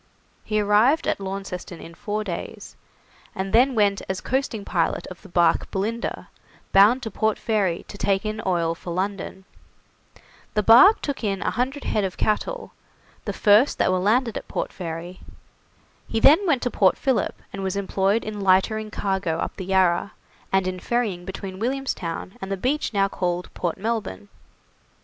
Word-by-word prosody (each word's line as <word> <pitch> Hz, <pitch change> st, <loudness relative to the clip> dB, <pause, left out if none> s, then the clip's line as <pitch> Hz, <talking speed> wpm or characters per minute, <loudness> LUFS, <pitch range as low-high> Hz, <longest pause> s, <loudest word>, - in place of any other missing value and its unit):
He 215 Hz, -1 st, 0 dB
arrived 215 Hz, +10 st, +3 dB
at -, -, 0 dB
Launceston 190 Hz, -3 st, -6 dB
in 165 Hz, -, -11 dB
four 210 Hz, +5 st, -3 dB
days, 180 Hz, -5 st, -7 dB, 0.6 s
and 190 Hz, 0 st, -4 dB
then 250 Hz, +3 st, +4 dB
went 205 Hz, -2 st, +2 dB
as 190 Hz, -1 st, -2 dB
coasting 255 Hz, -5 st, -2 dB
pilot 165 Hz, -3 st, 0 dB
of 185 Hz, -, -10 dB
the 200 Hz, -, -14 dB
barque 170 Hz, -1 st, +2 dB
'Belinda', 220 Hz, +4 st, -3 dB, 0.4 s
bound 215 Hz, +7 st, +5 dB
to 220 Hz, -, -4 dB
Port 220 Hz, +2 st, 0 dB
Fairy 200 Hz, -6 st, -1 dB
to 200 Hz, -, -10 dB
take 195 Hz, 0 st, +1 dB
in 215 Hz, 0 st, -3 dB
oil 170 Hz, -3 st, +1 dB
for 170 Hz, -, -10 dB
London. 190 Hz, +1 st, -4 dB, 1.1 s
The 210 Hz, -, +2 dB
barque 245 Hz, -, +7 dB
took 285 Hz, -4 st, -3 dB
in 195 Hz, -2 st, -1 dB
100 265 Hz, +3 st, -1 dB
head 210 Hz, -, 0 dB
of 190 Hz, -1 st, -3 dB
cattle, 475 Hz, -, -1 dB, 0.5 s
the -, -, -2 dB
first 210 Hz, +6 st, +4 dB
that -, -, +2 dB
were 185 Hz, -, +1 dB
landed 230 Hz, +4 st, +1 dB
at -, -, -8 dB
Port -, -, -3 dB
Fairy. 175 Hz, 0 st, -6 dB, 0.9 s
He 225 Hz, -, -1 dB
then 325 Hz, -, +6 dB
went 275 Hz, -7 st, +2 dB
to 245 Hz, -, -1 dB
Port 190 Hz, -3 st, +3 dB
Philip, 265 Hz, -3 st, 0 dB
and 195 Hz, -, -5 dB
was 190 Hz, 0 st, -2 dB
employed 200 Hz, +2 st, 0 dB
in 210 Hz, -1 st, -5 dB
lightering 200 Hz, +3 st, +2 dB
cargo 190 Hz, -6 st, -1 dB
up -, -, -3 dB
the 190 Hz, -, -6 dB
Yarra, 185 Hz, 0 st, +2 dB, 0.4 s
and 190 Hz, -1 st, +2 dB
in 185 Hz, 0 st, -3 dB
ferrying 210 Hz, -6 st, -1 dB
between 190 Hz, 0 st, -7 dB
Williamstown 225 Hz, -8 st, -3 dB
and 195 Hz, 0 st, -5 dB
the 195 Hz, -, -1 dB
beach 275 Hz, +10 st, -1 dB
now 200 Hz, -2 st, +2 dB
called 180 Hz, -2 st, -3 dB
Port 170 Hz, -2 st, -2 dB
Melbourne. 200 Hz, -, -3 dB
200 Hz, 170 wpm, -24 LUFS, 185-225 Hz, 1.1 s, barque